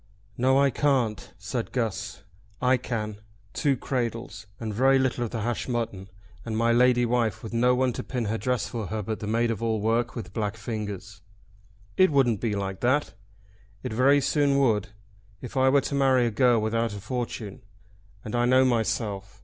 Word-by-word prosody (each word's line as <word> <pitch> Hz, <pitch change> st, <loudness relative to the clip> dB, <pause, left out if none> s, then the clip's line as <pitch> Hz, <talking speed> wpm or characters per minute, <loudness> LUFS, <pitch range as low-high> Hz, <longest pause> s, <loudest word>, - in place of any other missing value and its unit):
"No 130 Hz, +2 st, +3 dB
I 140 Hz, 0 st, +4 dB
can't," 130 Hz, -8 st, 0 dB
said 105 Hz, +4 st, -4 dB
Guss. 110 Hz, -4 st, -3 dB, 0.4 s
"I 125 Hz, +1 st, +3 dB
can; 110 Hz, -4 st, -4 dB, 0.3 s
two 140 Hz, -4 st, +1 dB
cradles, 120 Hz, -4 st, -4 dB
and 110 Hz, -2 st, -4 dB
very 135 Hz, +5 st, +4 dB
little 130 Hz, -2 st, 0 dB
of 120 Hz, -, -3 dB
the 115 Hz, -1 st, -4 dB
hashed 120 Hz, +3 st, -2 dB
mutton; 110 Hz, -6 st, -3 dB, 0.3 s
and 110 Hz, -2 st, -3 dB
my 115 Hz, +1 st, +3 dB
lady 120 Hz, 0 st, +4 dB
wife 115 Hz, -3 st, 0 dB
with 110 Hz, -, -7 dB
no 125 Hz, +2 st, +3 dB
one 130 Hz, -1 st, +1 dB
to -, -, -5 dB
pin 125 Hz, -3 st, -3 dB
her 110 Hz, +2 st, -2 dB
dress 125 Hz, -2 st, -1 dB
for 110 Hz, -2 st, -4 dB
her 110 Hz, +1 st, -3 dB
but 110 Hz, +2 st, -4 dB
the 105 Hz, -, -5 dB
maid 115 Hz, +2 st, +1 dB
of 115 Hz, -, -4 dB
all 110 Hz, -1 st, 0 dB
work 115 Hz, +3 st, 0 dB
with 95 Hz, -6 st, -7 dB
black 105 Hz, 0 st, -2 dB
fingers." 105 Hz, -3 st, -6 dB, 0.8 s
"It 185 Hz, -, +6 dB
wouldn't 130 Hz, -8 st, +2 dB
be 110 Hz, -3 st, -1 dB
like 95 Hz, -2 st, -3 dB
that." 130 Hz, +4 st, +1 dB, 0.7 s
"It 125 Hz, -, -4 dB
very 135 Hz, +5 st, +4 dB
soon 140 Hz, 0 st, +2 dB
would, 115 Hz, -7 st, +2 dB, 0.5 s
if 125 Hz, -, -9 dB
I 130 Hz, 0 st, +4 dB
were 140 Hz, +1 st, +4 dB
to -, -, -4 dB
marry 135 Hz, -3 st, +3 dB
a 115 Hz, -, 0 dB
girl 120 Hz, 0 st, +3 dB
without 110 Hz, 0 st, -1 dB
a -, -, -6 dB
fortune. 115 Hz, -3 st, -5 dB, 0.6 s
And 110 Hz, -, -4 dB
I 120 Hz, 0 st, +2 dB
know 130 Hz, +1 st, +5 dB
myself. 105 Hz, -4 st, -1 dB
115 Hz, 190 wpm, -26 LUFS, 110-125 Hz, 0.8 s, It